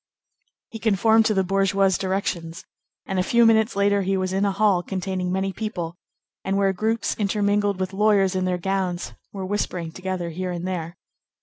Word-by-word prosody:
He 225 - -7
conformed 220 +1 +3
to 215 - +1
the 190 - +3
bourgeois's 195 0 +2
directions, 185 -3 -3 0.4
and 190 -1 -2
a - - +4
few 235 +5 +4
minutes 220 -1 +4
later 200 0 +2
he 195 0 0
was 185 0 -1
in 195 +1 +1
a 200 - +2
hall 195 -2 +2
containing 185 0 -3
many 190 +1 -1
people, 180 -7 -4 0.5
and 195 +1 0
where 195 -1 +2
groups, 220 +4 -1
intermingled 205 -1 +1
with 185 0 -2
lawyers 200 -2 +3
in 185 0 0
their 180 -1 0
gowns, 180 -8 -2 0.2
were 195 -2 -5
whispering 185 -4 -2
together 185 -1 -4
here 185 +3 -4
and 175 0 -4
there. 175 -2 -4
190 Hz, 180 wpm, -23 LUFS, 185-205 Hz, 0.5 s, a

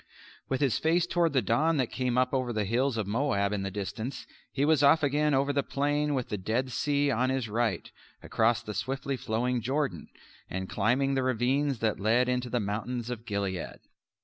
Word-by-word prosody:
With 130 0 -1
his 135 -7 +2
face 165 +2 +2
toward 170 -2 +1
the 130 -4 +2
dawn 150 +10 +2
that 130 -4 0
came 125 -1 -1
up 125 +1 +2
over 130 -2 0
the 110 -3 -1
hills 120 +4 0
of 110 - -1
Moab 105 -2 0
in 100 - -1
the 100 - -2
distance, 105 +6 -5 0.3
he 140 +1 0
was 155 -2 +3
off 150 +3 +5
again 145 +1 +2
over 140 +1 +1
the 140 - +2
plain 145 +2 0
with 125 -3 -2
the 105 - -3
Dead 120 +7 -1
Sea 145 +2 +1
on 130 +1 +1
his 130 -3 -1
right, 110 -4 -1 0.4
across 115 +1 +1
the 105 - -5
swiftly 135 +5 -2
flowing 120 +1 -1
Jordan, 130 - -2 0.4
and 95 +1 -4
climbing 125 +8 +1
the 135 - +1
ravines 130 +3 +1
that 110 -2 0
lead 115 +5 +3
into 125 0 -1
the 120 - 0
mountains 115 +4 -3
of 120 -1 -7
Gilead. 100 -4 -3
125 Hz, 200 wpm, -29 LUFS, 110-140 Hz, 0.4 s, off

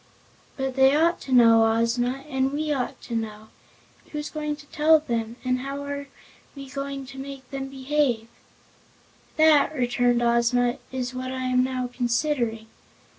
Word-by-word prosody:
"But 265 -1 -2
they 270 +1 +5
ought 335 +3 +2
to 265 - -8
know, 230 -2 +7
Ozma, 245 +4 0
and 265 -2 0
we 300 +1 -1
ought 255 -3 -3
to 235 - -5
know. 220 -1 -5 0.6
Who's 300 -1 -5
going 300 -1 -3
to 295 0 -15
tell 310 +2 +4
them, 230 -5 -3
and 255 0 +1
how 275 +2 -5
are 285 0 -5 0.5
we 275 -1 -9
going 275 0 -5
to 270 0 -10
make 270 -1 -8
them 270 -1 -4
behave?" 265 -4 0 1.1
"That," 310 -1 +5
returned 245 -1 +1
Ozma, 240 +1 +2
"is 255 -1 -3
what 255 0 -4
I 260 0 -4
am 255 0 +2
now 255 -1 -2
considering. 240 -2 -1
260 Hz, 155 wpm, -25 LUFS, 245-280 Hz, 1.1 s, know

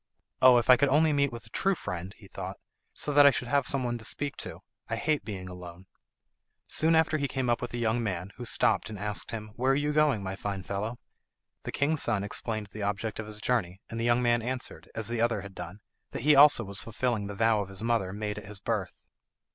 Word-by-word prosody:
"Oh, 130 -1 +8
if 120 - +1
I 125 - +8
could 140 0 +3
only 155 +3 +4
meet 140 -1 +2
with 115 -1 -8
a 110 - -14
true 195 - +1
friend," 95 - -6
he - - -15
thought, - - -7 0.3
"so 145 - 0
that 145 0 +8
I - - +10
should 125 -2 -2
have 140 -1 +2
some 140 -2 +1
one 120 -1 -2
to - - -10
speak 140 +3 -2
to. - - -7 0.3
I - - -1
hate 155 -2 0
being 95 -4 -6
alone." 90 0 -10 0.8
Soon 160 +1 +3
after 160 -1 +3
he 140 - 0
came 130 -3 -1
up 120 - 0
with 125 - -4
a - - -2
young 120 0 +1
man, 95 -3 -3
who 125 - -6
stopped 115 - +2
and 110 - -7
asked 105 +1 -4
him, 110 -2 -6
"Where 130 +3 +2
are - - +2
you 145 +1 0
going, 150 -9 +3
my 95 0 -4
fine 100 -1 -4
fellow?" 105 +5 -4 0.7
The - - -3
king's 150 +2 +1
son 105 -4 +4
explained 105 +1 -4
the 110 - -7
object 105 +2 -2
of 110 - -5
his 105 -1 -7
journey, 100 -6 -1
and 115 - -4
the - - -1
young 120 +1 +3
man 120 -1 +3
answered, 125 +2 -5
as 110 -2 -2
the 120 -1 -1
other 120 0 +1
had 100 -1 -10
done, 90 +3 -8 0.3
that - - -4
he 150 +1 +6
also 140 -3 +7
was 100 -1 -5
fulfilling 115 -2 -2
the 100 - -6
vow 115 0 +3
of 100 - -6
his 95 +1 -4
mother 115 -5 +1
made 105 +1 -4
at 100 - -12
his 105 -1 -4
birth. - - -3
115 Hz, 245 wpm, -29 LUFS, 100-130 Hz, 0.8 s, I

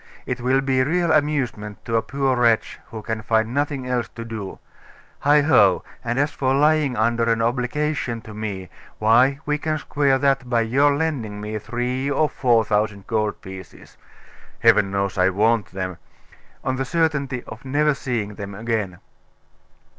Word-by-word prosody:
It - - -3
will 130 +2 +2
be 135 -1 +1
real 170 +5 +1
amusement 135 -9 -1
to 115 - -1
a 115 - +3
poor 135 0 0
wretch 115 -2 +2
who 110 -1 -8
can 115 0 -3
find 110 +1 +1
nothing 145 -2 -1
else 125 -2 -1
to 115 - -6
do 110 -4 -6 0.7
Heigho! 145 - +5 0.2
And 120 +1 -2
as 145 +2 +1
for 130 0 0
lying 150 -2 +3
under 115 +1 +2
an 115 - +1
obligation 125 +2 -1
to 110 - -11
me, 100 -4 -5 0.3
why 120 +6 +4
we 150 0 0
can 155 0 -1
square 145 -2 +1
that 135 -2 +1
by 120 -2 +2
your 140 +5 +3
lending 135 -10 -2
me 105 +1 -4
three 125 +5 -2
or 145 +2 +2
four 120 -5 +2
thousand 105 -2 -1
gold 110 -2 -1
pieces 95 -2 -11 0.7
Heaven 100 - +5
knows 100 -1 -2
I 90 +1 +5
want 110 +3 +2
them! 95 -2 -5 0.7
on 130 0 -1
the 135 - -1
certainty 145 -5 0
of 115 - -10
never 145 +3 +2
seeing 115 -6 -3
them 100 -1 -7
again. 110 -4 -2
120 Hz, 160 wpm, -22 LUFS, 110-140 Hz, 0.7 s, Heigho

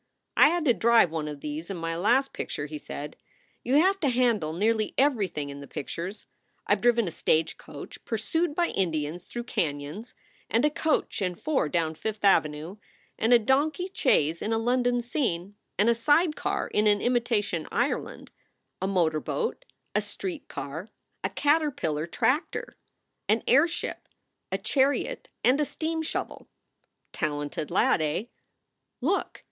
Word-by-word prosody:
"I - - +7
had 340 -1 0
to 250 - +5
drive 230 -7 +4
one 160 -2 -2
of 145 -2 -7
these 155 +3 -5
in 195 - -4
my 165 0 -3
last 245 +10 +2
picture," 145 - -4
he 150 0 -6
said. 145 +1 -7 0.5
"You 255 +3 +1
have 385 +4 +3
to 290 - +2
handle 235 -10 +2
nearly 215 +5 0
everything 195 - +1
in 140 0 -8
the 140 - -9
pictures. 175 +9 -6 0.4
I - - +3
ve 200 - 0
driven 235 -3 +3
a - - -3
stagecoach 160 0 -2
pursued 330 -2 -1
by 345 0 +2
Indians 160 -2 -1
through 240 - -5
canons; 155 +2 -3 0.3
and 230 +5 +3
a 300 - +3
coach 315 -7 0
and 180 -2 -2
four 290 - 0
down 160 0 0
Fifth 210 +5 -3
Avenue; 160 -1 +2 0.4
and 225 - +2
a 240 - +9
donkey 300 - +1
chaise 165 - +2
in 220 - -2
a 225 - +2
London 245 +1 +1
scene; 205 - -1 0.2
and 205 - +3
a 235 - +6
side 300 +8 +3
car - - -1
in 210 +1 +2
an 205 -1 +4
imitation 230 -8 0
Ireland, 245 +4 -2 0.5
a 190 - 0
motor 170 -5 +2
boat, 475 - -3 0.3
a - - +2
street 350 -6 -6
car, 160 +9 -6 0.3
a - - 0
caterpillar 285 - +1
tractor, 275 - 0 0.5
an 220 +2 +3
airship, 315 +7 +2 0.4
a 190 - +1
chariot, 275 - 0
and 260 +4 +4
a - - +4
steam 320 +2 -3
shovel. 320 - -4 0.7
Talented 145 0 -2
lad, - - +3
eh? 155 +5 0 0.8
Look - - -1
220 Hz, 155 wpm, -27 LUFS, 165-270 Hz, 0.8 s, a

